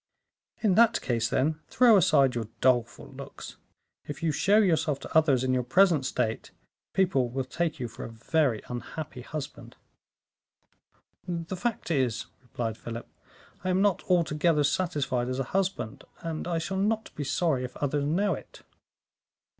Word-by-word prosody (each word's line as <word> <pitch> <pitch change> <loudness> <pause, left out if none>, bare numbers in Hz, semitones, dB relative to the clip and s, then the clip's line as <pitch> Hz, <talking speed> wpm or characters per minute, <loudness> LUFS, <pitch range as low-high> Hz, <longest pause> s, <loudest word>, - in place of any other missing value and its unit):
"In 205 -4 +4
that 230 +3 +5
case, 115 -2 -1
then, 155 +4 +1
throw 245 -3 +5
aside 140 -8 +4
your 115 -3 -3
doleful 120 -2 +1
looks. - - -10 0.5
If 145 +2 -7
you 165 - +2
show 195 +8 +3
yourself 160 -8 +2
to - - -9
others 145 -5 +4
in 130 0 +1
your 130 - +2
present 155 +2 +3
state, 110 0 -2 0.5
people 140 -10 +2
will 135 +2 -2
take 160 +4 -2
you 125 - -2
for 115 - -9
a - - -6
very 120 0 0
unhappy 125 +3 -6
husband." 150 +2 -7 1.5
"The 170 0 -3
fact 225 -2 -3
is," 130 -7 0 0.2
replied 115 -3 -4
Philip, 115 0 -7 0.6
"I 185 - -1
am 185 +2 +2
not 200 -4 +2
altogether 165 -3 +3
satisfied 140 -7 0
as 130 - -2
a 135 - 0
husband, 185 - -1 0.2
and 165 0 -4
I 170 -1 0
shall 190 +4 -3
not 220 +3 0
be 145 - -4
sorry 140 -2 0
if 125 0 -7
others 145 0 0
know 185 +6 +1
it." - - -10
150 Hz, 155 wpm, -28 LUFS, 125-180 Hz, 1.5 s, that